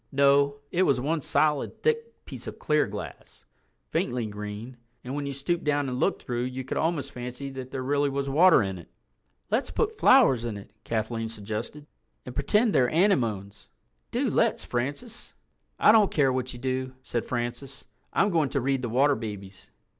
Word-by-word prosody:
No, 140 0 +4 0.2
it 180 - +1
was 140 -8 +3
one 155 +5 -1
solid 150 +1 0
thick 460 0 -1
piece - - -9
of - - -7
clear 150 -1 +1
glass, 105 +1 -9 0.5
faintly 120 -2 -1
green, 105 +3 -7 0.3
and 125 - -6
when 145 0 -3
you - - -2
stooped 140 +6 -2
down 145 -1 +1
and 125 -1 -3
looked - - 0
through 120 0 -2
you 130 +1 -4
could 130 - -4
almost 155 -4 -1
fancy 125 +2 -6
that 130 -1 -7
there 130 -1 -4
really 145 +2 +1
was 140 0 -2
water 160 0 +6
in 95 -2 -4
it. 85 - -14 0.6
"Let's 230 +6 +1
put 445 -1 -1
flowers 230 - +6
in 115 -3 -3
it," 100 - -12
Kathleen 115 0 -2
suggested, 110 +7 -6 0.4
"and 125 - -7
pretend 210 - +2
they're 125 -2 +4
anemones. 120 - 0 0.4
Do - - 0
let's, - - +1
Francis." 145 - -4 0.4
"I - - +6
don't 215 -3 +5
care 135 -4 +2
what 130 0 -2
you - - -8
do," 130 +1 -3
said 120 - -2
Francis. 120 +2 -5 0.3
"I'm 205 - +2
going 160 -5 +2
to 140 - 0
read 135 +1 0
The 120 - -3
Water 135 +5 +4
Babies." 100 -4 -8
135 Hz, 180 wpm, -27 LUFS, 120-150 Hz, 0.6 s, water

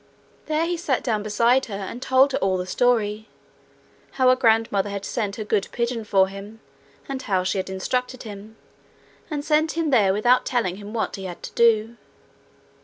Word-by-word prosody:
There 310 +1 +1
he 345 0 -2
sat 290 -6 -1
down 220 -4 0
beside 235 +5 +2
her 205 - -5
and 200 +5 -6
told 265 +1 +4
her - - -1
all 190 -1 +1
the 180 - -3
story 220 0 0 0.9
how 260 -1 +3
her 255 - +6
grandmother 225 -5 +2
had 200 -1 -5
sent 210 -5 -3
her 220 - -4
good 210 -1 0
pigeon 235 -2 -2
for 190 -2 +3
him, 200 +3 -10 0.5
and 270 -1 -4
how 190 -6 0
she 190 +1 -1
had 190 - -4
instructed 250 +7 -3
him, 215 0 -10 0.7
and 295 -2 -4
sent 310 +1 +2
him 325 -2 -1
there 210 -7 +4
without 240 +6 +3
telling 220 -8 -1
him 205 0 -9
what 220 -1 -2
he 190 - -7
had 175 -2 -8
to - - -6
do. 230 0 +3
225 Hz, 185 wpm, -23 LUFS, 200-255 Hz, 0.9 s, her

